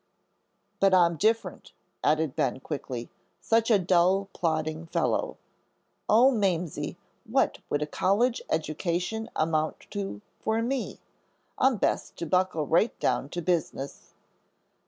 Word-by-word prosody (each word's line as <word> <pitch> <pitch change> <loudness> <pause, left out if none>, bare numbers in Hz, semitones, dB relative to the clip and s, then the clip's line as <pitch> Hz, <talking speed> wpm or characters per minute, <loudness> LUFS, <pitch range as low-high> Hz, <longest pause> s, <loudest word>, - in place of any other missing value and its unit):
"But 195 -1 +5
I'm 170 -2 +4
different," 220 +7 -1 0.3
added 155 -2 +2
Ben, 145 -4 0
quickly, 130 -4 -5 0.3
"such 225 0 +2
a 220 - +6
dull, 185 +2 +2
plodding 160 -1 -2
fellow. - - 0 0.7
Oh, 240 +5 +6
Mamsie, 180 - -1 0.3
what - - +1
would 145 +1 0
a - - -1
college 210 +10 +1
education 175 +7 -2
amount 155 -1 0
to 195 - -4 0.2
for 220 +1 0
me? 255 +1 -2 0.6
I'm 260 -3 +4
best - - -1
to 170 - -4
buckle 180 -2 +1
right 170 +10 +2
down 135 - 0
to 175 +2 -4
business." 160 -5 -3
175 Hz, 120 wpm, -27 LUFS, 155-210 Hz, 0.7 s, a